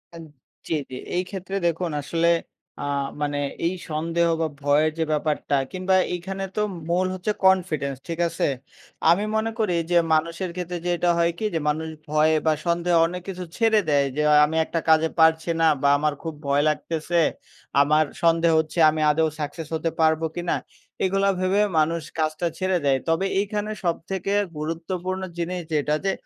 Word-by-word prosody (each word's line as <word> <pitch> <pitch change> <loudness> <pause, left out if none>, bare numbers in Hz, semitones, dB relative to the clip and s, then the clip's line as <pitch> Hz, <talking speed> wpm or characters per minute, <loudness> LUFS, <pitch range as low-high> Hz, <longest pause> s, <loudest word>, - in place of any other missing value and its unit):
আ - - -8 0.5
জি, - - -1 0.2
জি - - -5 0.2
এই 180 - +1
ক্ষেত্রে 195 0 -6
দেখুন 170 +1 -1
আসলে 165 +4 0 0.5
আ - - -4 0.4
মানে 145 -1 -1 0.3
এই 175 - +1 0.2
সন্দেহ 165 +2 0
বা 160 - +1 0.2
ভয়ের 150 +2 +3
যে - - +3
ব্যাপারটা 150 -1 0 0.2
কিংবা 185 0 +1 0.2
এইখানে 190 +2 -4
তো 210 - 0 0.3
মূল 180 +2 +2
হচ্ছে 185 +3 -2
কনফিডেন্স 165 -7 +2
ঠিক 165 -1 -4
আছে? 165 - -1 0.6
আমি 200 +5 +2
মনে 220 +1 0
করি 205 -6 +1 0.2
যে 175 - +5 0.2
মানুষের 165 +3 0
ক্ষেত্রে 180 0 -4
যে 175 - +1
এটা 175 - +1
হয় 170 0 +3
কি 220 - -2
যে 165 - 0
মানুষ 160 +2 -1 0.2
ভয় 155 +1 +3
বা 160 - +4
সন্দেহে 170 0 +2
অনেক 180 +2 -4
কিছু 185 -1 -5
ছেড়ে 225 -2 +4
দেয়। 140 -1 +3
যে, 150 - +1 0.2
"আমি 160 +2 -4
একটা 165 - -2
কাজে 160 0 +5
পারছি 160 +1 +4
না 165 - +5
বা 140 - +4
আমার 150 +1 0
খুব 165 - -4
ভয় 140 +1 +3
লাগতেছে 165 +2 -1 0.6
আমার 155 +2 +3 0.2
সন্দেহ 165 0 +4
হচ্ছে, 160 +2 -2
আমি 155 0 -2
আদৌ 160 +1 +2
সাক্সেস 150 +1 -5
হতে 160 +1 -1
পারব 160 0 +3
কিনা?" 175 0 -1 0.5
এগুলা 195 +1 +2
ভেবে 185 +3 +2 0.2
মানুষ 165 +2 +1 0.2
কাজটা 155 +2 0
ছেড়ে 185 -1 +1
দেয়। 135 -1 +3
তবে 165 +4 +1
এইখানে 210 +1 -2
সবথেকে 180 +3 -2 0.3
গুরুত্বপূর্ণ 175 +4 -3 0.2
জিনিস 175 +1 -2
যেটা 150 0 +1
যে 195 - +3
165 Hz, 170 wpm, -24 LUFS, 155-185 Hz, 0.6 s, যে